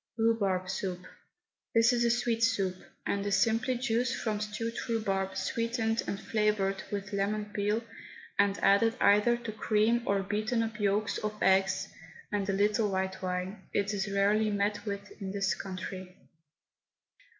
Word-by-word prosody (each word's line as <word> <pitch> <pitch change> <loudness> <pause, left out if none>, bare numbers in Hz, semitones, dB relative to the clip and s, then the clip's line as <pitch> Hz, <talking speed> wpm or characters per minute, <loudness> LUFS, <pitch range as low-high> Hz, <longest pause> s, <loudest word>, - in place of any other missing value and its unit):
RHUBARB 200 -5 +1
SOUP. 185 -1 -2 0.8
This 230 +2 +5
is 240 -1 +2
a 235 - +3
sweet 235 -1 +1
soup, 200 -6 +2 0.3
and 200 0 0
is 200 -1 +2
simply 230 +5 +2
juice 245 0 0
from 215 -2 -1
stewed 215 +2 -3
rhubarb 195 -4 -1
sweetened 230 +2 0
and 195 - -2
flavoured 210 -3 0
with 205 0 -4
lemon 205 +2 0
peel 210 +2 0 0.6
and 200 0 +3
added 225 +4 +4
either 210 +4 +5
to 235 -2 -6
cream 220 +2 +2
or 200 0 +2
beaten 215 +4 0
up 225 -1 -5
yolks 205 0 +1
of 210 0 -3
eggs 190 0 +3 0.4
and 205 -1 -1
a - - +2
little 210 +2 +2
white 190 0 -2
wine. 185 +2 -3
It 200 +1 0
is 200 0 -2
rarely 205 +2 +3
met 205 +1 -1
with 200 0 -4
in 190 0 -4
this 195 -1 +1
country. 185 -1 -7
205 Hz, 150 wpm, -30 LUFS, 195-225 Hz, 0.8 s, This